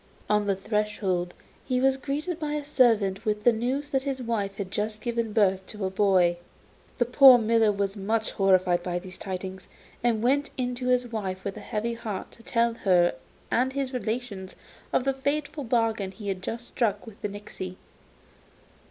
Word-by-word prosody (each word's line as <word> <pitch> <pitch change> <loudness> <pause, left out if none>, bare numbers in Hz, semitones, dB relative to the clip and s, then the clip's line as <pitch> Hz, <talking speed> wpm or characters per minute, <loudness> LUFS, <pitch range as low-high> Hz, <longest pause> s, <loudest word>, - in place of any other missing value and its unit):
On 210 -1 +2
the 195 - +2
threshold 195 -3 -1 0.3
he 255 -2 0
was 265 +1 +3
greeted 295 +5 -3
by 300 -2 -2
a 300 -1 -3
servant 225 -8 +3
with 210 -2 -1
the 240 - +6
news 260 +6 -2
that 270 -2 +2
his 270 -1 -3
wife 220 -5 -2
had 195 -2 -5
just 215 +1 -2
given 230 0 -2
birth 195 -3 +2
to 210 -2 -4
a 190 - -1
boy. 185 -3 +3 0.6
The 240 - +2
poor 255 +1 +8
miller 225 -1 +3
was 200 0 -2
much 220 +2 -1
horrified 185 -2 +3
by 175 0 -2
these 185 +1 -8
tidings, 190 0 -6 0.4
and 230 -2 +2
went 285 +4 +2
in 250 -1 -1
to 250 0 -4
his 250 0 +3
wife 190 -4 -3
with 200 - -4
a - - -7
heavy 230 +1 -2
heart 215 -4 -5
to - - -17
tell 235 0 +1
her 180 -6 +3 0.4
and 260 +2 +2
his 275 -1 -2
relations 225 -5 -4 0.4
of - - +2
the 270 +1 +1
fatal 290 +2 -2
bargain 225 -5 +1
he 200 +2 -7
had 190 -1 -3
just 230 +5 -5
struck 210 -4 0
with 220 -3 -13
the 210 - -2
nixy. 195 -2 -7
220 Hz, 185 wpm, -27 LUFS, 195-250 Hz, 0.6 s, poor